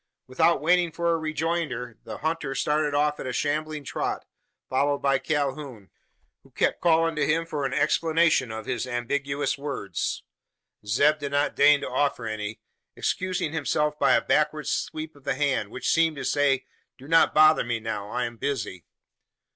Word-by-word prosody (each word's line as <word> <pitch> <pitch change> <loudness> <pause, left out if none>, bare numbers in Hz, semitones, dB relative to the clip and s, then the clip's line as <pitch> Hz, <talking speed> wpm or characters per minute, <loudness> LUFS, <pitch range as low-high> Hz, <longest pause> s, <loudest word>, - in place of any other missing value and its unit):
Without 135 +4 +2
waiting 175 0 +3
for 170 +1 0
a 165 - +2
rejoinder, 155 -6 -3
the - - -6
hunter 155 -3 -2
started 150 0 0
off 150 0 +1
at - - -5
a - - -2
shambling 150 +3 -2
trot, - - -3 0.4
followed 140 +2 +1
by 135 -1 +1
Calhoun, 135 -7 -3 0.5
who - - -22
kept - - 0
calling 165 -1 +3
to 150 -2 0
him 165 +2 +1
for 150 -4 -2
an 130 - -6
explanation 160 -6 +2
of 110 0 -6
his 120 0 -2
ambiguous 140 +4 -2
words. 135 - -3 0.6
Zeb 145 +9 +3
did 140 -1 -5
not 145 +1 +1
deign 145 0 +5
to - - -4
offer 140 -5 0
any 110 -1 -4 0.4
excusing 185 -4 -2
himself 150 -1 0
by - - +4
a - - +3
backward 150 0 +1
sweep 155 0 -3
of 140 - -19
the - - -1
hand, 135 -7 0
which 130 - -5
seemed 165 -1 +3
to 140 - -5
say, 140 -2 +2 0.3
"Do 135 0 -13
not 165 +1 +4
bother 155 0 +6
me 120 -1 -2
now: 105 -2 -4
I 125 +2 -1
am 120 0 -7
busy." 115 -10 -3
145 Hz, 170 wpm, -26 LUFS, 130-155 Hz, 0.6 s, bother